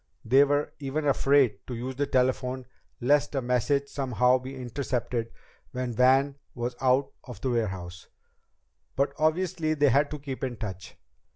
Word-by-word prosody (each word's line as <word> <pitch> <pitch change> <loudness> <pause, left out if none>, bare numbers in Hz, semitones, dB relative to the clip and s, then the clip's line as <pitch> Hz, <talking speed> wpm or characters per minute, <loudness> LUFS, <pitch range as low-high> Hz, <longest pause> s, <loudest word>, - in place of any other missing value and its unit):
They 130 +5 +6
were 145 +1 0
even 145 +2 -3
afraid 135 -5 +3
to 125 - -4
use 130 +3 -5
the 140 +1 -1
telephone, 130 0 0 0.3
lest 145 +3 +2
a 135 - +1
message 125 +3 +1
somehow 130 -2 +2
be 130 +1 -8
intercepted 125 -2 -3 0.4
when 125 -1 -3
Van 135 +4 +3 0.2
was 120 0 -3
out 130 +1 +2
of 125 -6 -9
the 130 - 0
warehouse. 95 -6 -3 0.9
But 140 +1 +1
obviously 160 0 +1
they 145 -1 +4
had 145 +3 +3
to 150 - -5
keep 135 -2 -7
in 125 -3 -3
touch. 95 -5 -7
130 Hz, 155 wpm, -27 LUFS, 125-140 Hz, 0.9 s, They